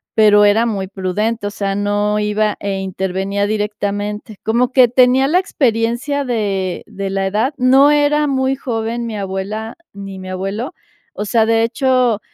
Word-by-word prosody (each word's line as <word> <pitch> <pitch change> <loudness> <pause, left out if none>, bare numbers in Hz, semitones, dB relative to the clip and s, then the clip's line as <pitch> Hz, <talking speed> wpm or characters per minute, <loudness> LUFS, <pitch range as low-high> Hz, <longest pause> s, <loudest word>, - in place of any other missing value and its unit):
Pero 210 -1 +6
era 215 +3 +3
muy 200 -5 -2
prudente, 205 +4 -2
o 205 - -2
sea, 195 -1 -2
no 205 +1 0
iba 210 0 0
e 195 -1 -3
intervenía 190 +1 -2
directamente. 210 0 -3
Como 240 +3 +1
que 255 -1 +6
tenía 255 +2 +4
la 325 +5 +3
experiencia 260 -2 0
de 200 -6 -2
de 200 -2 -5
la 195 0 -1
edad, 220 +9 0
no 265 +3 +5
era 295 0 +2
muy 265 -1 0
joven 235 -2 -3
mi 225 -2 -5
abuela 200 +3 -4 0.2
ni 195 -1 -8
mi 185 0 -8
abuelo, 195 - -4 0.4
o 210 - -4
sea, 220 +1 +2
de 225 0 +2
hecho, 250 -1 +1
215 Hz, 160 wpm, -17 LUFS, 200-245 Hz, 0.4 s, Pero